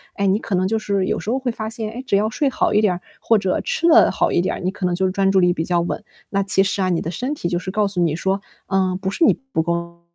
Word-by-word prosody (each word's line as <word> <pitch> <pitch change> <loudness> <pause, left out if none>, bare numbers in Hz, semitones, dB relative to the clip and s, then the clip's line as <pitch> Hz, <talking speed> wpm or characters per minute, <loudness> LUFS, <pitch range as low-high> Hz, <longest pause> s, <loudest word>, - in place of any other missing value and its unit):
哎， 200 - -1
你 195 +2 +2
可 205 - -3
能 185 +1 +1
就 220 +3 0
是 200 -3 0
有 - - -1
时 - - -5
候 255 - +1
会 260 -2 -1
发 220 -1 -5
现， 225 -2 -4
诶， 250 +3 -7
只 200 - +2
要 210 +2 +1
睡 275 +5 0
好 260 - 0
一 210 - +4
点 185 -4 +1 0.2
或 225 - +3
者 190 -2 0
吃 335 - 0
了 335 - +6
好 - - +1
一 - - +2
点， 185 - -2
你 185 - +1
可 195 -2 -4
能 175 - 0
就 185 +1 +1
专 195 0 +2
注 195 - +4
力 180 -1 +4
比 160 - -2
较 175 +1 +1
稳。 180 +5 -3 0.3
那 195 - +1
其 195 0 +2
实 195 0 -1
啊， 185 - +1
你 175 -2 +1
的 165 - -4
身 255 - -3
体 175 - -3
就 175 0 -1
是 185 - -6
告 210 0 +1
诉 190 -3 -1
你 160 -3 +1
说， 190 +3 -1 0.3
嗯， 190 -1 +1
不 190 -1 -2
是 330 - +2
你 - - +6 0.2
不 160 - +1
够 170 0 -3
195 Hz, 330 characters per minute, -21 LUFS, 180-215 Hz, 0.3 s, 了